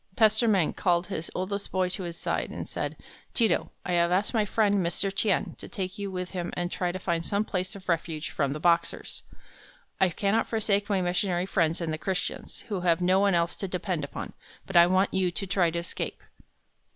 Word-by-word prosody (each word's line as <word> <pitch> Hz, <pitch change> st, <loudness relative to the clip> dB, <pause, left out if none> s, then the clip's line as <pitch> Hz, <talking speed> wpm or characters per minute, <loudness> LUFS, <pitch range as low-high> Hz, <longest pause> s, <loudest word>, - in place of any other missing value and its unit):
Pastor 220 Hz, +1 st, +4 dB
Meng 190 Hz, -7 st, +3 dB
called 175 Hz, -1 st, +2 dB
his 170 Hz, -5 st, -5 dB
oldest 200 Hz, +2 st, -3 dB
boy 185 Hz, -1 st, +2 dB
to 185 Hz, +2 st, -4 dB
his 170 Hz, -2 st, -5 dB
side, -, -, -1 dB
and -, -, -6 dB
said: -, -, -4 dB, 0.4 s
"Ti 230 Hz, -, +5 dB
to, 170 Hz, -, 0 dB, 0.2 s
I 180 Hz, -, -2 dB
have 170 Hz, 0 st, +3 dB
asked 195 Hz, +6 st, +1 dB
my 220 Hz, -3 st, +3 dB
friend, 205 Hz, -2 st, +2 dB
Mr. 185 Hz, +3 st, -1 dB
Tien 200 Hz, -1 st, +1 dB
to -, -, -8 dB
take 190 Hz, +1 st, -5 dB
you 200 Hz, -1 st, -3 dB
with 180 Hz, -1 st, -4 dB
him 175 Hz, -2 st, -3 dB
and 175 Hz, 0 st, -1 dB
try 180 Hz, -1 st, -1 dB
to 185 Hz, -, -4 dB
find 170 Hz, -2 st, -1 dB
some 200 Hz, +4 st, 0 dB
place 185 Hz, -2 st, -3 dB
of 190 Hz, -1 st, -11 dB
refuge 165 Hz, -2 st, -1 dB
from 140 Hz, -2 st, 0 dB
the 150 Hz, -, -5 dB
Boxers. 170 Hz, 0 st, +1 dB, 0.8 s
I 190 Hz, -, +5 dB
cannot 200 Hz, +6 st, +1 dB
forsake 210 Hz, -2 st, +1 dB
my 195 Hz, -2 st, +2 dB
missionary 180 Hz, 0 st, +1 dB
friends 170 Hz, -3 st, +1 dB
and 160 Hz, -2 st, -1 dB
the 155 Hz, -, -3 dB
Christians, 190 Hz, +2 st, -3 dB
who 200 Hz, -4 st, -4 dB
have 170 Hz, -1 st, +3 dB
no 185 Hz, +1 st, +3 dB
one 200 Hz, -2 st, +4 dB
else 170 Hz, 0 st, +1 dB
to 195 Hz, -, -3 dB
depend 180 Hz, -3 st, -2 dB
upon, 140 Hz, -, -6 dB, 0.3 s
but 195 Hz, -, -8 dB
I 170 Hz, 0 st, +8 dB
want 185 Hz, +2 st, +2 dB
you 190 Hz, -1 st, +2 dB
to 195 Hz, +3 st, -4 dB
try 185 Hz, -2 st, +2 dB
to 165 Hz, -, -3 dB
escape." 170 Hz, +1 st, -3 dB
185 Hz, 215 wpm, -28 LUFS, 170-200 Hz, 0.8 s, I